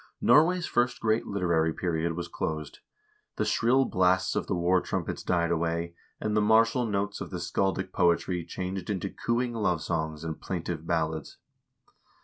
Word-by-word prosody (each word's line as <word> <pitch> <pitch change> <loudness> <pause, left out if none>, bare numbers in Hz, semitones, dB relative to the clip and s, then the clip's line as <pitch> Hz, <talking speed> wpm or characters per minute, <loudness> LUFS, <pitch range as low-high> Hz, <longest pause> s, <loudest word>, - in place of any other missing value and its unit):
Norway's 170 +3 +4
first 120 +1 +1
great 110 0 +1
literary 85 -5 +1
period 85 -1 -1
was 85 +1 -4
closed. 75 -3 -4 0.6
The - - 0
shrill 130 +4 +3
blasts 95 -2 +2
of - - -1
the - - 0
war 90 +1 +2
trumpets - - -3
died 85 -1 +1
away, 85 0 -1 0.3
and 105 0 -1
the 105 - +4
martial 115 +3 +4
notes 100 -1 -2
of - - -5
the - - -4
scaldic 95 -1 -1
poetry 85 0 +2
changed 90 +2 -5
into 100 -1 -2
cooing 120 +1 -1
love 90 -8 0
songs 80 -2 -2
and 80 -1 -5
plaintive 85 -3 -4
ballads. 80 -3 -2
90 Hz, 155 wpm, -28 LUFS, 85-105 Hz, 0.6 s, Norway's